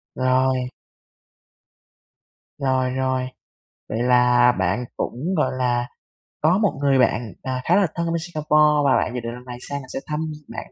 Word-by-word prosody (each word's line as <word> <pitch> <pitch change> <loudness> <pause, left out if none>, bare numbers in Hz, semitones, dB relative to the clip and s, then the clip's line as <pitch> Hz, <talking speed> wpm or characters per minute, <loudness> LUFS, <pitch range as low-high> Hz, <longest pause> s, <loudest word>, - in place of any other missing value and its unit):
Rồi. 130 0 +1 1.9
Rồi, 130 -2 +1
rồi. 130 -1 -1 0.6
Vậy 110 +2 -2
là 125 0 +5
bạn 95 +7 0
cũng, 160 +10 -3
gọi 150 - +2
là, 120 -1 0 0.5
có 160 +5 +4
1 205 -8 +1
người 135 -2 +3
bạn, 110 -4 +1
à, 130 -1 -3
khá 175 - +3
là 195 -2 +4
thân 170 -1 -1
bên 170 0 0
Singapore, 150 -2 +2
và 135 - +4
bạn - - -1
dự 125 - -2
định 115 0 -5
lần 125 +1 -11
này 125 -1 -7
sang 140 0 -3
là 130 - -13
sẽ - - -2
thăm 150 0 -2 0.3
bạn - - -8
130 Hz, 170 wpm, -22 LUFS, 125-150 Hz, 1.9 s, là